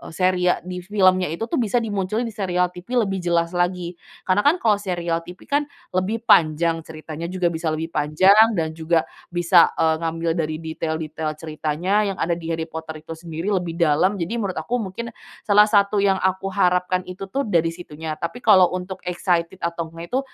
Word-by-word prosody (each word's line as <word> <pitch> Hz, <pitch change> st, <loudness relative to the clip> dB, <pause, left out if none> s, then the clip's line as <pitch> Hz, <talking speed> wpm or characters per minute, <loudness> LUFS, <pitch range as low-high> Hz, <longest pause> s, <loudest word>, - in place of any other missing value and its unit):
serial 185 Hz, 0 st, +2 dB
di 180 Hz, 0 st, -5 dB
filmnya 185 Hz, -1 st, +2 dB
itu, 165 Hz, +8 st, -4 dB
tuh, 230 Hz, -, -1 dB
bisa 230 Hz, -2 st, -1 dB
dimunculin 210 Hz, +1 st, -1 dB
di 230 Hz, -, -4 dB
serial 180 Hz, -3 st, 0 dB
TV 225 Hz, +7 st, -1 dB
lebih 195 Hz, -2 st, -2 dB
jelas 170 Hz, -1 st, 0 dB
lagi. 175 Hz, -1 st, -2 dB, 0.2 s
Karena, 185 Hz, +1 st, +2 dB
kan, 310 Hz, -, +5 dB
kalau 215 Hz, -, +2 dB
serial 175 Hz, -4 st, -2 dB
TV, 180 Hz, -, -8 dB
kan, 290 Hz, +1 st, 0 dB, 0.2 s
lebih 205 Hz, +5 st, -1 dB
panjang 165 Hz, -2 st, +4 dB
ceritanya, 155 Hz, +1 st, -7 dB
juga 180 Hz, -1 st, 0 dB
bisa 165 Hz, 0 st, -3 dB
lebih 160 Hz, +1 st, -2 dB
panjang 190 Hz, +10 st, +5 dB
dan 160 Hz, -2 st, -1 dB
juga 160 Hz, 0 st, +1 dB, 0.2 s
bisa, 175 Hz, 0 st, +5 dB
eee, 160 Hz, 0 st, +2 dB
ngambil 165 Hz, 0 st, -1 dB
dari 155 Hz, -1 st, -1 dB
detail-detail 160 Hz, -1 st, -4 dB
ceritanya 155 Hz, +4 st, -2 dB, 0.2 s
yang -, -, -19 dB
ada 170 Hz, -, 0 dB
di 170 Hz, -1 st, -3 dB
Harry 165 Hz, -1 st, -2 dB
Potter 160 Hz, -1 st, -8 dB
itu 165 Hz, -, -10 dB
sendiri 165 Hz, +3 st, -4 dB
lebih 175 Hz, -4 st, -1 dB
dalam. 170 Hz, +4 st, +2 dB
Jadi 195 Hz, +6 st, -3 dB
menurut 195 Hz, -4 st, -2 dB
aku 245 Hz, 0 st, -2 dB
mungkin 230 Hz, +4 st, -5 dB, 0.3 s
salah 210 Hz, 0 st, +5 dB
satu 205 Hz, -1 st, +3 dB
yang 195 Hz, -1 st, +3 dB
aku 190 Hz, +1 st, 0 dB
harapkan 180 Hz, -1 st, +1 dB
itu, 185 Hz, +1 st, -8 dB
tuh, 275 Hz, +8 st, -1 dB
dari 170 Hz, -6 st, +2 dB
situnya, 160 Hz, -2 st, -6 dB
tapi 170 Hz, +10 st, -5 dB
kalau 190 Hz, -7 st, +5 dB
untuk 185 Hz, +1 st, -5 dB
excited 180 Hz, 0 st, -1 dB
atau 170 Hz, -1 st, -3 dB
ngga 165 Hz, +1 st, -9 dB
itu, -, -, +3 dB
180 Hz, 185 wpm, -22 LUFS, 165-195 Hz, 0.3 s, kan